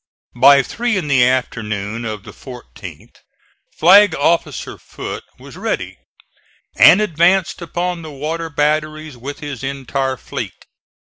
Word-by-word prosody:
By 140 +3 +6
three 235 - -2
in 180 - -3
the 135 -3 +4
afternoon 115 -3 -2
of 105 -3 -5
the - - -11
14th 125 -3 -12 0.6
Flag 190 +2 +6
officer 165 +4 -1
Foote - - -7 0.2
was - - -13
ready, - - -4 0.8
and 165 - +7
advanced 180 0 +1
upon 175 +1 -3
the 160 - -9
water 155 +4 -4
batteries 155 0 -1
with 140 +6 -8
his 145 -5 -7
entire 135 -1 -3
fleet. - - -7
145 Hz, 125 wpm, -18 LUFS, 130-165 Hz, 0.8 s, and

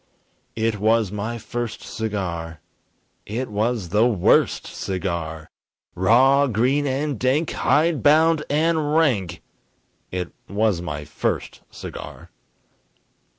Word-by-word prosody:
It 110 -1 -1
was 110 -1 +2
my 105 +3 -3
first 120 0 -5
cigar! 90 -8 -4 0.7
It 120 +5 -3
was 105 -2 -1
the 105 +6 +4
worst 100 -7 +2
cigar! 85 -4 -4 0.4
Raw, 130 +9 +4
green 130 +5 +1
and 140 -1 -2
dank, 135 +6 +1
hide 150 +1 +2
bound 155 +2 +4
and 155 0 +1
rank 120 - +1 0.7
It 90 -1 -4 0.2
was 100 -2 +1
my 75 -3 -5
first 75 - -3
cigar! - - -9
115 Hz, 105 wpm, -22 LUFS, 95-140 Hz, 0.7 s, the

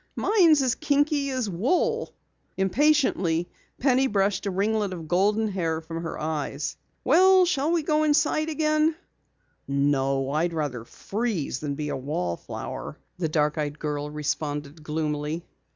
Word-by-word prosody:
"Mine's 335 -9 +4
as 255 -2 +2
kinky 290 0 +1
as 255 -4 -1
wool." 350 - 0 0.5
Impatiently 190 - +2 0.3
Penny 265 0 +3
brushed 200 -2 0
a - - +1
ringlet 205 +1 0
of 165 -3 -7
golden 205 +6 +2
hair 165 -5 -1
from 165 +1 -6
her 165 - -5
eyes. 150 -2 -3 0.3
"Well, 370 +5 +6
shall 310 -3 0
we 340 -2 +1
go 305 0 +2
inside 310 +1 +2
again?" 310 +1 +2 0.7
"No, 135 -1 +1
I'd 165 +4 0
rather 140 -7 -3
freeze 200 - -3
than 145 -2 -3
be 150 0 -4
a - - -2
wallflower," 130 - -4 0.2
the 165 -3 0
dark 150 0 +1
eyed 145 0 -2
girl 150 -1 -3
responded 150 0 -3
gloomily. 150 +1 -3
180 Hz, 135 wpm, -26 LUFS, -, 0.7 s, Well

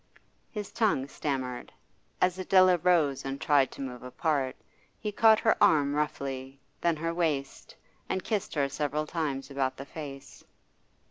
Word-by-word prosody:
His 210 -3 -6
tongue 200 - +1
stammered. 130 -4 -4 0.5
As 185 0 +2
Adela 185 -1 +5
rose 160 -6 +2
and 135 0 -4
tried 140 -3 +3
to - - -6
move 125 -2 -6
apart, 135 +1 -1 0.4
he 210 - -3
caught 220 +1 +6
her 220 - +4
arm 150 -8 +4
roughly, 135 -2 -3 0.2
then 170 -1 +2
her 165 +2 -2
waist, 155 -6 -2 0.3
and 190 - -1
kissed 210 -6 -2
her 140 -2 +2
several 150 +2 -2
times 150 -4 -3
about 135 -1 -1
the 140 - -7
face. 140 -2 -9
150 Hz, 145 wpm, -29 LUFS, 135-175 Hz, 0.5 s, caught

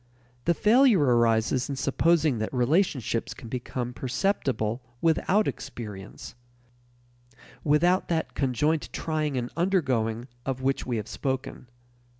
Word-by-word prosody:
The 170 - +3
failure 235 - +5
arises 120 0 +2
in 140 - -2
supposing 150 -1 +2
that 110 - -2
relationships 130 - 0
can 115 - -10
become 125 0 -4
perceptible 125 - -1 0.2
without 180 +7 +2
experience 105 -3 -7 1.3
without 170 +5 +3
that 165 -2 -1
conjoint 145 +4 0
trying 155 -3 -2
and 120 -1 -3
undergoing 130 - 0 0.2
of 130 -1 -3
which 135 +1 0
we 120 -2 -1
have 105 -1 -4
spoken. 130 -1 -4
135 Hz, 115 wpm, -27 LUFS, 120-160 Hz, 1.3 s, failure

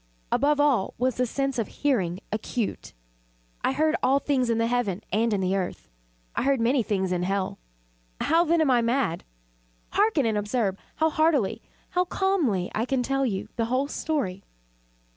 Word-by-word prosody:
Above 290 +3 +2
all 275 -9 +2
was 255 +1 0
the 250 0 +1
sense 275 +1 -1
of 220 - -1
hearing 190 -12 0
acute. 215 +1 -3 0.7
I - - +2
heard 310 +4 +2
all 270 +2 +4
things 270 -4 0
in 230 - +2
the 230 - +2
heaven 230 -6 -1
and 225 +2 +2
in 200 -2 +1
the 185 +1 +1
earth. 185 -2 -4 0.4
I - - 0
heard 275 0 +2
many 245 +3 +3
things 190 -4 -1
in 180 -1 0
hell. 190 +1 -1 0.6
How, 330 +2 +3
then, 335 0 +2
am 295 -4 +3
I 245 -1 +4
mad? 235 -7 0 0.7
Hearken! 405 - +2
and 220 -2 +1
observe 205 -1 0 0.2
how 320 0 +2
healthily 285 -9 +2 0.3
how 360 0 +2
calmly 330 - 0
I 220 - 0
can 255 0 0
tell 270 +1 +1
you 195 -4 -3
the 230 - +1
whole 255 +4 0
story. 250 -12 -2
245 Hz, 175 wpm, -26 LUFS, 205-285 Hz, 0.7 s, all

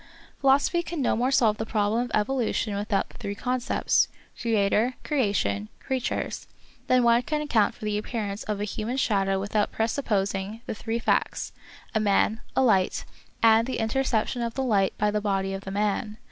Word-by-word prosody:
Philosophy 280 +5 +3
can 340 -1 -5
no 260 - +2
more 245 +3 +1
solve 225 -5 +3
the 220 - -2
problem 215 +2 +1
of 245 - -9
evolution 220 -2 0
without 205 -1 -1
the - - -15
three 200 0 -4
concepts. 250 +2 +1 0.3
Creator, 225 +2 +2
Crea 265 -9 +1
tion, 100 - -1
Creatures, 260 -2 -3 0.4
than 255 -1 +4
one 235 0 +5
can 300 +4 -2
account 230 -9 +2
for - - -8
the 210 0 0
appearance 210 -2 -4
of 210 -1 -2
a - - -1
human 215 +4 -3
shadow 195 -6 +1
without 205 +1 0
presupposing 210 -3 -1
the - - -3
three 225 +1 -3
facts, 235 - 0 0.4
a 220 - +2
man, 215 +2 +2
a 265 - +4
light, 195 -7 +2 0.4
and 225 +2 +5
an - - -2
interception 240 0 0
of 235 -1 -3
the 265 - -1
light 200 -6 +1
by 210 0 +1
the 210 0 0
body 195 -2 0
of 195 0 -6
the - - -5
man. 210 +1 -1
220 Hz, 180 wpm, -26 LUFS, 205-245 Hz, 0.4 s, one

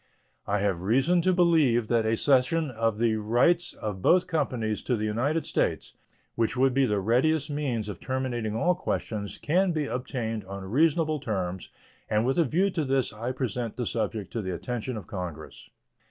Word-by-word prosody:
I 100 - +1
have 95 -4 0
reason 135 - +3
to 185 +2 +3
believe 160 -10 +3
that 115 -2 +2
a 110 +1 +1
cession 140 +4 +2
of 115 -2 0
the 115 -1 +2
rights 125 +12 +2
of 105 -3 -5
both 180 - +4
companies 125 -9 -1
to 125 - 0
the 110 -1 -2
United 130 +10 0
States, - - -1 0.4
which 115 +2 -1
would 130 0 +3
be 135 0 +3
the 105 -2 +1
readiest 135 +8 +1
means 130 -7 -2
of 105 - -6
terminating 125 -5 -2
all 175 +10 +2
questions, 110 - -3
can 180 +4 +1
be 155 -2 -1
obtained 120 -4 -3
on 100 0 -7
reasonable 155 - +2
terms, 95 -8 -3 0.4
and 110 +1 +2
with 135 +6 +1
a 165 - +4
view 185 +9 +1
to 165 -3 -1
this 135 -4 0
end 105 - -13
I 120 +2 -1
present 125 -3 -3
the 120 - -2
subject 110 -2 -3
to 115 - -2
the 95 -3 -3
attention 125 +3 -4
of 100 - -7
Congress. 90 -5 -7
120 Hz, 185 wpm, -27 LUFS, 110-150 Hz, 0.4 s, both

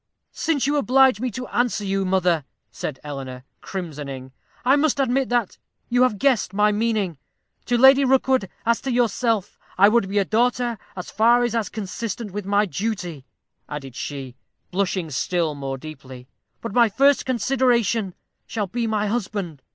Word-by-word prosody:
"Since 300 -5 0
you 290 +1 +1
oblige 265 -4 +4
me 255 +2 -1
to 250 +3 -6
answer 240 -4 0
you, 195 0 0
mother," 180 -4 +2 0.3
said 140 -4 -5
Eleanor, 135 -3 -7 0.2
crimsoning, 145 -8 -6 0.3
"I 265 +2 +5
must 290 -1 +1
admit 265 0 +1
that 240 -5 0 0.3
you 245 +1 +2
have 255 -5 +3
guessed 240 -6 +1
my 210 +1 +4
meaning. 210 -7 -1 0.5
To 245 - +1
Lady 265 +3 +7
Rookwood, 260 -5 +2 0.2
as 230 0 +2
to 270 - -3
yourself, 230 -3 0 0.2
I 200 +2 +7
would 215 -3 +2
be 205 - -1
a 200 - +3
daughter 240 +1 +1 0.2
as 180 - -7
far 235 +3 +4
as 240 -2 0
is 225 -5 -1
consistent 215 +1 -5
with 200 0 -5
my 205 +1 +3
duty," 185 -8 -4 0.4
added 135 -4 -7
she, 135 -4 -6 0.4
blushing 185 -3 -1
still 165 +3 0
more 135 -2 -5
deeply, 130 -3 -11 0.3
"but 230 -3 -5
my 235 -1 +5
first 275 +6 +3
consideration 235 -5 +1 0.3
shall 220 -2 -2
be 230 +4 -2
my 215 -1 0
husband. 200 - -3
210 Hz, 160 wpm, -23 LUFS, 180-245 Hz, 0.5 s, Lady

